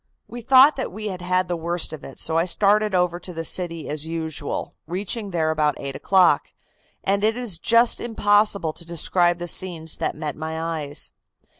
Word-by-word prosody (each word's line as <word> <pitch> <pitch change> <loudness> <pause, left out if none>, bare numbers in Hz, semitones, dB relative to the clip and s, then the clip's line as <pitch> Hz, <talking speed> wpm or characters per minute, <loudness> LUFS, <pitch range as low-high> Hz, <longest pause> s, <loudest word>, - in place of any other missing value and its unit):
We 240 - -8
thought 265 +5 +6
that 265 - -3
we 215 +2 -5
had 185 -2 -6
had 185 +1 0
the 175 - -2
worst 170 0 -2
of 155 - -8
it, 135 - -10
so 160 - +1
I 165 +1 +3
started 205 +2 +2
over 180 -1 +1
to 180 - -8
the 165 - -4
city 165 -1 -2
as 150 +1 -2
usual, 160 -3 -4
reaching 200 +5 -3
there 160 -3 0
about 150 -1 0
eight 140 -1 -6
o'clock, 180 -6 +3 0.5
and 200 +1 0
it 220 +2 +2
is 225 -10 -3
just 235 +4 +4
impossible 205 -6 +2
to 170 - -7
describe 175 +1 +2
the 175 0 -6
scenes 165 -2 -2
that - - -2
met 150 -2 -4
my 160 +1 -5
eyes. 160 -3 -3
175 Hz, 190 wpm, -23 LUFS, 160-205 Hz, 0.5 s, thought